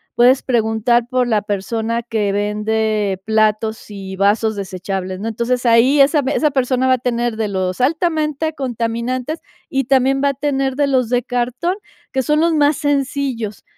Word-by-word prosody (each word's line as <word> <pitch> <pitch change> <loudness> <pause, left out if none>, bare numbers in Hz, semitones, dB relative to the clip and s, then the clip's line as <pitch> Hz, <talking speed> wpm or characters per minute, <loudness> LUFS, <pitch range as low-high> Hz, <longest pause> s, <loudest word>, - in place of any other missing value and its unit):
puedes 250 +2 +4
preguntar 235 0 +1
por 250 0 0
la 220 -3 +2
persona 225 +4 -2
que 220 -4 -1
vende 210 -1 -1
platos 220 0 0
y 195 -2 -7
vasos 210 +3 +2
desechables, 190 -1 -4
¿no? 215 - -4
Entonces, 235 +3 -1
ahí 240 +5 +5
esa 290 +3 +4
esa 300 0 +2
persona 260 -1 +1
va 260 - +5
a - - +2
tener 240 -2 -1
de 220 - -1
los 185 +2 -2
altamente 315 +1 0
contaminantes, 250 +2 -3 0.3
y 270 -2 0
también 270 +1 +2
va 280 - +4
a - - -1
tener 275 -2 -1
de 285 0 +1
los 255 -4 +1
de 245 -1 +1
cartón, 250 +9 -1 0.4
que 265 - +1
son 300 +4 +2
los 335 +1 +2
más 295 -1 +3
sencillos. 275 -7 -2
240 Hz, 165 wpm, -18 LUFS, 220-270 Hz, 0.4 s, ahí